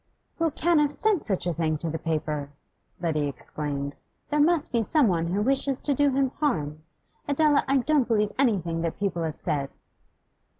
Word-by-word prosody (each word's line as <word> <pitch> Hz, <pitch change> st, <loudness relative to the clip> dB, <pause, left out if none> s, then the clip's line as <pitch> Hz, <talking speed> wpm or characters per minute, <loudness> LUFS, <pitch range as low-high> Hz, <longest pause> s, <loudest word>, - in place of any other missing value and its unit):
'Who 330 Hz, 0 st, +2 dB
can 335 Hz, +2 st, +2 dB
have 295 Hz, -1 st, +2 dB
sent 420 Hz, 0 st, +1 dB
such 195 Hz, -5 st, -1 dB
a 175 Hz, -, 0 dB
thing 155 Hz, -1 st, 0 dB
to 165 Hz, -, -5 dB
the 160 Hz, -, -3 dB
paper?' 155 Hz, -3 st, -2 dB, 0.5 s
Letty 155 Hz, -4 st, 0 dB
exclaimed. 140 Hz, 0 st, -4 dB, 0.4 s
'There 300 Hz, -, +2 dB
must 315 Hz, 0 st, +2 dB
be 235 Hz, -2 st, +2 dB
someone 205 Hz, -, +2 dB
who 195 Hz, +4 st, 0 dB
wishes 270 Hz, +1 st, +1 dB
to 290 Hz, -, +1 dB
do 285 Hz, +1 st, +3 dB
him 265 Hz, -1 st, +1 dB
harm. 155 Hz, -, -1 dB, 0.5 s
Adela, 290 Hz, 0 st, +3 dB
I 275 Hz, +1 st, +3 dB
don't 275 Hz, 0 st, +2 dB
believe 210 Hz, -3 st, +1 dB
anything 180 Hz, -, +1 dB
that 165 Hz, -1 st, -2 dB
people 195 Hz, -4 st, -1 dB
have 160 Hz, -2 st, -2 dB
said! 140 Hz, -2 st, -2 dB
205 Hz, 175 wpm, -26 LUFS, -, 0.5 s, do